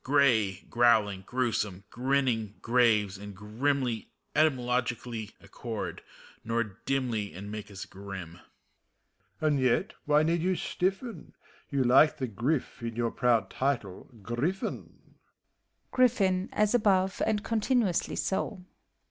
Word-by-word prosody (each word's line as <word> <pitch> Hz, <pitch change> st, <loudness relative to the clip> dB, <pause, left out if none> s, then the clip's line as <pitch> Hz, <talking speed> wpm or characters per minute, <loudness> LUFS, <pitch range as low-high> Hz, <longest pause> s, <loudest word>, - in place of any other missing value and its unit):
Gray, 115 Hz, -9 st, +3 dB
growling, 110 Hz, -5 st, +3 dB
g^rewsome, 110 Hz, -6 st, -1 dB
grinning, 125 Hz, -5 st, 0 dB
.gp^ves, 110 Hz, -5 st, +3 dB
and 105 Hz, -1 st, -8 dB
grimly 120 Hz, +4 st, -1 dB, 0.3 s
Etymologically 125 Hz, -6 st, 0 dB
accord, 110 Hz, +2 st, -6 dB, 0.4 s
nor 115 Hz, +1 st, +1 dB, 0.2 s
dimly, 120 Hz, -, -1 dB
And 100 Hz, +3 st, -7 dB
make 105 Hz, -1 st, -6 dB
us 95 Hz, -2 st, -7 dB
grim. 95 Hz, -4 st, -8 dB, 1.0 s
MEPHISTOPHEIiES. 155 Hz, -, +2 dB
And 145 Hz, -2 st, +2 dB
yet, 130 Hz, -2 st, +2 dB
why 150 Hz, +1 st, +4 dB
need 165 Hz, +1 st, +1 dB
you 185 Hz, +2 st, +1 dB
stiffen 190 Hz, -, -3 dB
f -, -, -41 dB, 0.3 s
You 140 Hz, -2 st, +2 dB
like 135 Hz, +5 st, +5 dB
the 130 Hz, -, -1 dB
grif 125 Hz, +7 st, -2 dB
in 115 Hz, -1 st, -4 dB
your 120 Hz, -1 st, 0 dB
proud 115 Hz, -6 st, +2 dB
title, 125 Hz, -9 st, -2 dB
"Griffin." 135 Hz, -, -3 dB
120 Hz, 100 wpm, -29 LUFS, 105-135 Hz, 1.0 s, like